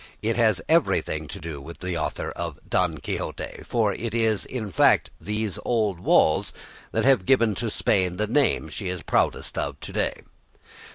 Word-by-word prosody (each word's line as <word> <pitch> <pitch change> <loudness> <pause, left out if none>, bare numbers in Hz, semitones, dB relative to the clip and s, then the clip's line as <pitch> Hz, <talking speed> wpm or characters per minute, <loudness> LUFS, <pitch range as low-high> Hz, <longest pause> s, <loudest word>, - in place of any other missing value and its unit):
It 115 +1 +1
has 110 -5 +2
everything 110 - +2
to 100 - -7
do 80 -6 -7
with 85 +4 -9
the 90 -1 -4
author - - -2
of - - -5
"Don 90 -4 +1
Quixote," - - -5
for 110 -4 +1
it 115 0 -4
is 110 -3 +1
in 110 -6 -4
fact 75 - +4
these 105 -3 -3
old 105 -7 0
walls 95 - +3 0.4
that - - 0
have 135 -8 +5
given 115 -5 +4
to 115 - -1
Spain 90 -3 +1
the 105 - +1
name 125 - +2
she 95 +5 -5
is 90 -2 -4
proudest - - 0
of - - -3
to - - -8
day. - - -1
105 Hz, 175 wpm, -25 LUFS, 90-115 Hz, 0.4 s, have